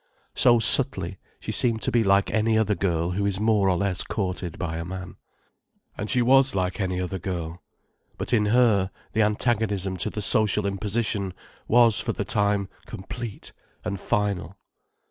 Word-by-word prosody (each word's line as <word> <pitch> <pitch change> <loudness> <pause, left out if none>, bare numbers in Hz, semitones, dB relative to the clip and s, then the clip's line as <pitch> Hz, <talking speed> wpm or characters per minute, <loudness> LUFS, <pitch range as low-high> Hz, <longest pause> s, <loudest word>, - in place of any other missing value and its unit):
So 120 -1 +4
subtly, 100 -6 +5 0.2
she - - -5
seemed 115 -2 -1
to - - 0
be 120 -1 +2
like 100 0 +2
any 110 0 +1
other 110 -1 +1
girl 85 -3 -1
who 100 +3 -2
is 100 -1 0
more 105 -3 +2
or 90 - +1
less 100 -1 0
courted 90 -4 -4
by 80 -2 -4
a 85 - -4
man. 90 +1 -8 0.8
And 105 - -5
she 125 - +2
was 135 +2 +4
like 95 +2 -2
any 90 -1 -2
other 90 +1 -4
girl. 85 -2 -5 0.6
But - - -4
in 105 -3 +2
her, 105 -5 +3 0.2
the 110 - +1
antagonism 105 -3 0
to 85 - 0
the 105 - -5
social 105 -2 +3
imposition 100 -1 -2 0.3
was 115 -2 +4
for - - -2
the 100 - -4
time 100 -1 0 0.2
complete 110 +2 -8 0.3
and 100 - -3
final. 100 -2 -2
100 Hz, 165 wpm, -24 LUFS, 95-110 Hz, 0.8 s, subtly